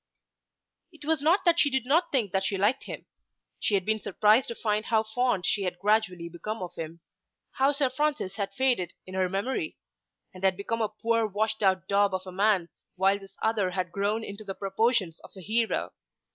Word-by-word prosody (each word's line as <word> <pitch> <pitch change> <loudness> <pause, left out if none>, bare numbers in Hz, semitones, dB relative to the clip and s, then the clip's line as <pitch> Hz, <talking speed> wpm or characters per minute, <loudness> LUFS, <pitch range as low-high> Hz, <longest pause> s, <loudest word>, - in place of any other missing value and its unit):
It 310 -4 -11
was 315 -2 +1
not 335 +7 +3
that 340 -1 +5
she 290 - +5
did 265 -3 0
not 330 +6 +2
think 230 -9 +1
that 190 0 +1
she 195 0 -1
liked 210 +8 +1
him. - - -7 0.5
She 205 - +1
had 190 -2 0
been 220 0 +1
surprised 215 +5 +3
to 235 - -5
find 215 -1 -1
how 220 -1 +2
fond 220 -3 0
she 205 - +1
had 180 -2 -2
gradually 195 -3 +1
become 185 +5 -5
of 175 - -7
him; 165 +1 -7 0.5
how 270 +2 +3
Sir 280 -1 +2
Francis 270 -7 -1
had 200 -2 -3
faded 250 -9 +1
in 185 - -10
her 185 -1 +1
memory, 260 - -2 0.6
and 185 0 -12
had 190 -1 +3
become 230 +3 -2
a 215 - +1
poor 225 +1 0
washed 215 +2 -1
out 190 -2 +2
daub 200 -1 +3
of 185 0 -5
a 185 - -7
man 195 -2 +2 0.3
while 195 +2 +3
this 195 -1 -15
other 215 -4 +2
had 180 -1 -3
grown 205 +4 -1
into 200 0 -7
the 195 -2 -6
proportions 195 -3 0
of - - -12
a - - -9
hero. 225 +4 0
210 Hz, 205 wpm, -28 LUFS, 190-235 Hz, 0.6 s, that